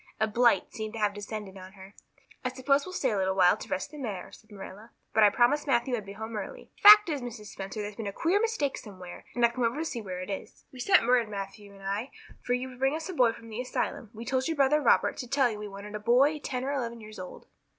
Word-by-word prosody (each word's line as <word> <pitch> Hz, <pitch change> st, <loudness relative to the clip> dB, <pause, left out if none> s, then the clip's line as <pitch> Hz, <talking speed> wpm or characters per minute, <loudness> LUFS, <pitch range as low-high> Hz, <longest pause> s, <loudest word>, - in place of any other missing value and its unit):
A 220 Hz, -, +3 dB
blight 235 Hz, +2 st, +2 dB
seemed 220 Hz, -2 st, -5 dB
to -, -, -5 dB
have 205 Hz, -1 st, +1 dB
descended 205 Hz, -1 st, -7 dB
on 185 Hz, +1 st, -11 dB
her. 195 Hz, 0 st, -13 dB, 0.5 s
"I 255 Hz, -, 0 dB
suppose 275 Hz, +4 st, +1 dB
we'll 370 Hz, -, -7 dB
stay 265 Hz, -8 st, 0 dB
a 210 Hz, -, 0 dB
little 190 Hz, 0 st, 0 dB
while 180 Hz, -2 st, +5 dB
to -, -, -10 dB
rest 190 Hz, -, -3 dB
the 300 Hz, -, -10 dB
mare," 210 Hz, -9 st, -5 dB
said 215 Hz, -, -17 dB
Marilla, 205 Hz, +2 st, -11 dB, 0.2 s
"but 220 Hz, -, +4 dB
I 210 Hz, -, +8 dB
promised 245 Hz, +8 st, +2 dB
Matthew 245 Hz, -1 st, +2 dB
I'd 210 Hz, -4 st, -6 dB
be 200 Hz, -, -7 dB
home 220 Hz, +2 st, -7 dB
early. -, -, -7 dB
The 410 Hz, -, +10 dB
fact 420 Hz, -1 st, +10 dB
is, 295 Hz, -5 st, -2 dB
Mrs. 230 Hz, -4 st, -8 dB
Spencer, 195 Hz, +2 st, -6 dB
there's 205 Hz, 0 st, -7 dB
been 225 Hz, -3 st, -4 dB
a -, -, -2 dB
queer 340 Hz, -, +1 dB
mistake 450 Hz, -12 st, -1 dB
somewhere, 185 Hz, -4 st, -11 dB
and 240 Hz, -1 st, +4 dB
I've 235 Hz, -, +1 dB
come 255 Hz, -, -2 dB
over 230 Hz, +4 st, +1 dB
to 320 Hz, -, -2 dB
see 240 Hz, -7 st, -4 dB
where 185 Hz, -3 st, -6 dB
it 185 Hz, -, -5 dB
is. 195 Hz, -, -7 dB
We 260 Hz, -, -11 dB
send 375 Hz, 0 st, +4 dB
word, 240 Hz, -2 st, +3 dB
Matthew 200 Hz, 0 st, -7 dB
and 195 Hz, 0 st, -15 dB
I, 200 Hz, +6 st, -2 dB, 0.3 s
for 245 Hz, -, 0 dB
you 255 Hz, +1 st, -4 dB
to 250 Hz, -, -13 dB
bring 270 Hz, +2 st, +2 dB
us 320 Hz, +3 st, -5 dB
a -, -, -4 dB
boy 250 Hz, -7 st, +4 dB
from 230 Hz, 0 st, -12 dB
the 225 Hz, +3 st, -4 dB
asylum. 250 Hz, -3 st, -3 dB
We 230 Hz, 0 st, -9 dB
told 260 Hz, 0 st, 0 dB
your 325 Hz, -2 st, -2 dB
brother 285 Hz, +2 st, +4 dB
Robert 250 Hz, -, +3 dB
to 250 Hz, -, -5 dB
tell 265 Hz, -1 st, +2 dB
you 210 Hz, -, -6 dB
we 210 Hz, -, -5 dB
wanted 200 Hz, +1 st, -9 dB
a 210 Hz, -, -4 dB
boy 260 Hz, +8 st, +3 dB
ten 255 Hz, -3 st, -4 dB
or 275 Hz, -, -1 dB
eleven 235 Hz, -4 st, -3 dB
years 215 Hz, -2 st, -11 dB
old." 185 Hz, -, -9 dB
230 Hz, 275 wpm, -28 LUFS, 205-265 Hz, 0.5 s, The